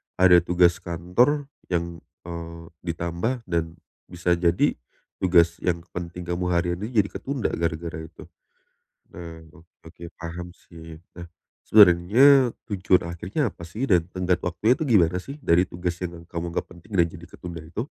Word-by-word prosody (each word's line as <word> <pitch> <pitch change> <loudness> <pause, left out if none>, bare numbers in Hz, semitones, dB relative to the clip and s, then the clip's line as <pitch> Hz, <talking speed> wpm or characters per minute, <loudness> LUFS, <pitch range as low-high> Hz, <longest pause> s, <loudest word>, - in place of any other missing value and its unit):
ada 90 -1 +6
tugas 85 0 +3
kantor 95 - +1 0.2
yang, 85 -2 -2 0.2
eee, 85 -1 -7 0.3
ditambah 85 +9 -2
dan 85 -2 -2 0.3
bisa 90 0 -2
jadi 85 0 +2 0.4
tugas 85 -2 +3
yang 85 -2 -1
penting 90 0 -6
kamu 85 +1 -2
harian 85 0 0
nih 105 +4 -5
jadi 100 - -8
ketunda 135 -3 -2
gara-gara 80 0 -3
itu. 80 - -14 0.9
Nah, 85 -1 -9
ok 80 - -16 0.2
oke 85 +1 -14 0.2
paham 85 +1 -7
sih. 80 -2 -13 0.2
Nah, 85 0 -9 0.4
sebenarnya 110 +8 +6 0.2
tujuan 95 -4 +1
akhirnya 85 - -2
apa 85 - -14
sih 105 +11 -4
dan 90 -5 +4
tenggat 90 -1 -1
waktunya 90 +8 +2
itu - - -5
gimana 90 -7 +4
sih 140 +7 -9
dari 90 - +3
tugas 85 0 -3
yang 85 -1 -6
kamu 85 0 -5
anggap - - -3
penting 90 +5 -16
dan 85 - +5
jadi 85 +1 -11
ketunda 85 -3 -8
itu? 100 - -5
85 Hz, 155 wpm, -24 LUFS, 85-95 Hz, 0.9 s, ada